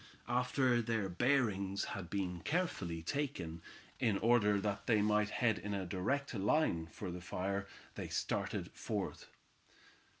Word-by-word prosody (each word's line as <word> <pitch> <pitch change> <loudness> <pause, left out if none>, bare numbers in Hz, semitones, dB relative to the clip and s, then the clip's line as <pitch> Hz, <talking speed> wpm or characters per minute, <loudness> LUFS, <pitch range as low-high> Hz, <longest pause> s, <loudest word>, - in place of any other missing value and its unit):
After 125 0 +2
their 110 -4 0
bearings 100 -3 +2
had 95 -5 -5
been 90 -3 -2
carefully 100 - -1
taken, 85 - -2 0.4
in 110 -4 +2
order 105 -3 +4
that 100 0 -2
they 115 -3 +5
might 105 0 +3
head 110 -2 +2
in 105 0 -3
a 95 -1 -2
direct 130 +12 -1
line 100 - +2
for 90 +3 -6
the 90 0 -6
fire, 100 +3 -2 0.3
they - - -5
started - - -1
forth. - - -3
105 Hz, 135 wpm, -36 LUFS, 95-120 Hz, 0.4 s, they